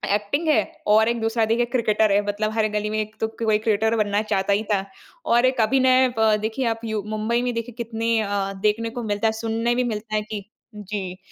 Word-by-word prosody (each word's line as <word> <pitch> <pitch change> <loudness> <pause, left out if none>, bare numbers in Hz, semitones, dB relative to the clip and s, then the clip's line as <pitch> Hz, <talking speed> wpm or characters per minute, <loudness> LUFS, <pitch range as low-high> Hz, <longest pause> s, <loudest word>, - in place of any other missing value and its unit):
Acting 285 +11 -2
है 215 -9 +4 0.2
और 220 +2 +5
एक 235 -1 -1
दूसरा 225 0 +1
देखिए 235 +2 +1
क्रिकेटर 220 -3 +2
है। 205 - +4
मतलब 215 +1 -1
हर 220 -1 +2
गली 210 0 -2
में 215 0 -1
एक 215 +1 -7
तो 220 - +2
कोई 220 -1 0
क्रिकेटर 220 +1 +1
बनना 205 +1 0
चाहता 195 +1 +1
ही 210 +2 +1
था। 195 0 0 0.4
और 240 +2 +3
एक 255 -2 +2
अभिनय 260 +2 +4
अ, 220 -1 +4
देखिए 220 +4 -2
आप 225 - -17
यू 215 -2 -2
मुंबई 230 +3 0
में 245 -1 -1
देखिए 230 +1 -4
कितने 230 0 -1
अ, 200 -1 -2
देखने 230 +2 0
को 240 +1 -6
मिलता 210 +1 0
है, - - +2
सुनने 230 +1 0
भी 250 - +1
मिलता 215 0 -5
है 210 - +1
कि 205 -2 -4 0.3
जी, 195 -3 -5
220 Hz, 225 wpm, -23 LUFS, 210-230 Hz, 0.4 s, और